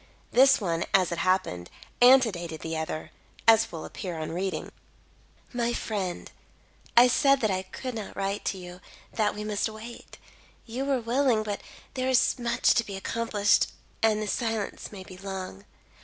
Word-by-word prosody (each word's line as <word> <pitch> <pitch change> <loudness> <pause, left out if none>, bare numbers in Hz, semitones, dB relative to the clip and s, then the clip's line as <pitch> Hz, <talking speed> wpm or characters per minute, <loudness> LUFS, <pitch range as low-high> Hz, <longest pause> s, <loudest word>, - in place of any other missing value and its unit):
This 270 +2 +6
one, 170 -5 -1
as 185 -3 +3
it 170 - -2
happened, 185 - 0 0.3
antedated 215 - +4
the 160 0 -4
other, 155 0 -4 0.4
as 225 0 +6
will 165 - -6
appear 180 -5 -6
on 155 0 -4
reading 185 +3 -2
it: - - -14 0.8
"My 240 -1 0
friend: 195 -7 -3 0.7
"I 245 +1 +9
said 275 +2 +4
that 220 -3 +2
I 185 0 0
could 250 +7 -7
not 220 -3 -6
write 195 +1 -2
to 195 - -1
you 180 0 -10 0.3
that 215 -2 +1
we 210 - -5
must 210 +1 -1
wait. 220 +2 -10 0.5
You 245 +4 -4
were 275 -2 +1
willing; 235 -1 +2
but 205 -1 -4 0.3
there 260 0 -1
is 260 0 +3
much 235 -1 +2
to 230 - +2
be 200 -3 -7
accomplished, 205 0 +2 0.3
and 220 -1 +3
the 215 - -3
silence 225 -2 -2
may 195 -3 -8
be 185 0 -12
long. 195 0 -6
210 Hz, 170 wpm, -27 LUFS, 185-235 Hz, 0.8 s, I